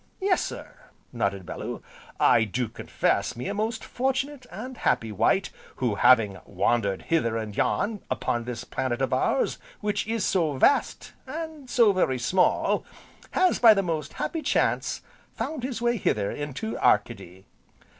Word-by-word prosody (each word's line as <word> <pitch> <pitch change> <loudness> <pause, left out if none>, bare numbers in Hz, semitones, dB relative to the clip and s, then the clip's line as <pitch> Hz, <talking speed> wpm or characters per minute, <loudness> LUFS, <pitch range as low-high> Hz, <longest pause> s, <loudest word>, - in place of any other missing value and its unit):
"Yes, 380 -1 +2
sir," - - -7 0.3
nodded 100 -5 -1
Bellew, - - -6 0.4
"I 115 - +5
do 115 +3 -2
confess 100 0 -1
me 120 - -5
a 200 - -2
most 220 +2 -2
fortunate, 265 +1 -2
and 245 +7 -7
happy, 110 -1 +1
wight 180 - +1 0.2
who, 125 -4 0
having 105 -3 +4
wandered 100 -5 0
hither 115 -9 +1
and 110 -2 -5
yon 210 - 0
upon 120 -2 -1
this 120 0 -5
planet 130 -2 -2
of 135 -1 0
ours, - - +1 0.2
which 210 0 -1
is 225 -3 -1
so 165 -6 +1
vast, 140 - +1
and 310 -2 -7
so 230 -5 +5
very 135 -8 +1
small, 180 +9 +2 0.5
has, 370 -1 +3
by 225 -3 +8
the 195 - +1
most 160 -4 -3
happy 325 - -3
chance, - - 0 0.3
found 310 -4 -4
his 245 -2 -4
way 240 0 +2
hither 105 - 0
into 145 +10 -4
Arcady." 90 +2 0
165 Hz, 150 wpm, -26 LUFS, -, 0.5 s, by